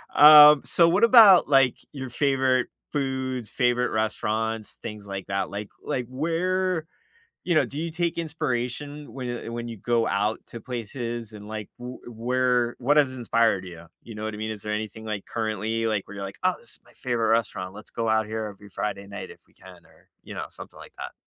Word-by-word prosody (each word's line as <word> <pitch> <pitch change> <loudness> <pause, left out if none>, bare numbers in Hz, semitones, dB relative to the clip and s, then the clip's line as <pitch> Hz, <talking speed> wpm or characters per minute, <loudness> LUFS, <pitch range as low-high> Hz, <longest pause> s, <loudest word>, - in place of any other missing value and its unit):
um, 150 -1 +10
so 170 -1 +5
what 185 +6 +2
about, 220 -6 +8
like, 135 -3 +4 0.2
your 130 -2 -6
favorite 130 -1 +1 0.3
foods, 130 -4 -2
favorite 125 0 +1
restaurants, 110 +1 -2
things 105 -1 -7
like 95 -1 -5
that, 95 0 -2
like 100 +1 -6
like, 125 -2 -2
where 170 +4 -1 0.6
you 175 - +1
know, 155 - +4
do 145 - -7
you 165 0 -3
take 170 0 -1
inspiration 145 -1 -3
when 130 -2 -5
you 120 -1 -5
when 120 0 -5
you 115 - -7
go 115 +3 0
out 105 +2 0
to 115 - -9
places 120 -1 -5
and, 105 -1 -10
like, 110 -1 -6
w 125 +1 -8
uh, - - -8
where 125 +1 +1
what 145 +5 +2
has 135 -3 +3
inspired 115 -5 +1
you, 85 -2 -11 0.2
you 115 - -10
know 105 - -5
what 110 -1 -4
I - - -6
mean? 110 0 -3
Is 105 -2 -6
there 105 - -3
anything, 110 +1 -5
like, 105 -2 -5
currently, 110 0 -2
like, 110 -3 -1
where 100 - -9
you're 100 - -5
like, 95 - -8
"Oh, - - +3
this - - -3
is - - -7
my - - -21
favorite 120 -3 -1
restaurant. 110 -5 0
Let's 105 - -11
go 115 -1 -2
out 110 -1 +2
here 110 0 -3
every 100 0 -11
Friday 100 0 -4
night 100 0 -8
if - - -13
we - - -31
can," - - -16
or, - - -25 0.2
you - - -9
know, - - -4
something - - -10
like - - -13
that? - - -6
120 Hz, 210 wpm, -25 LUFS, 110-135 Hz, 0.6 s, um